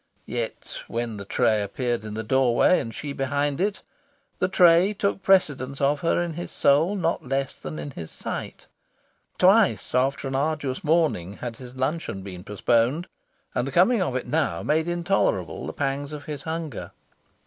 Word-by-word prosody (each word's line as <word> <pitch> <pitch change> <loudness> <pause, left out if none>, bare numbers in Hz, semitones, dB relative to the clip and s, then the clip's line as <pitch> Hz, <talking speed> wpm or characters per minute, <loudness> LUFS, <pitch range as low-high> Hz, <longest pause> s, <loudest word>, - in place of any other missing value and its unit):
Yet, 115 0 -5
when 115 -2 -3
the 100 - -7
tray 105 +1 +2
appeared 120 +3 -2
in 105 -1 -6
the 110 - -3
doorway, 130 - +4
and 115 - -4
she 145 +4 -5
behind 145 +2 -1
it, 205 +1 -1 0.6
the 185 - +2
tray 180 +1 +5
took 200 0 -1
precedence 145 -9 +2
of 140 +1 +2
her 165 +2 +1
in 170 -1 -4
his 175 +2 -6
soul 155 +8 +3
not 165 -7 -1
less 135 0 -1
than 155 - -7
in 145 - -5
his 85 -10 -8
sight. - - -6 0.7
Twice, 195 +3 +4
after 135 +2 +1
an 135 - -4
arduous 140 -1 -1
morning, 155 - +1
had 115 +1 -6
his 125 -1 -11
luncheon 130 - -2
been 90 -2 -8
postponed, 120 - +1 0.5
and 125 - -1
the - - -4
coming 190 - +4
of 135 -8 -1
it 130 - -2
now 160 -1 0
made 160 +2 +1
intolerable 175 - 0
the - - -3
pangs 140 +1 -2
of 150 -1 -7
his 150 -2 -5
hunger. 160 -1 -5
140 Hz, 170 wpm, -25 LUFS, 120-165 Hz, 0.7 s, tray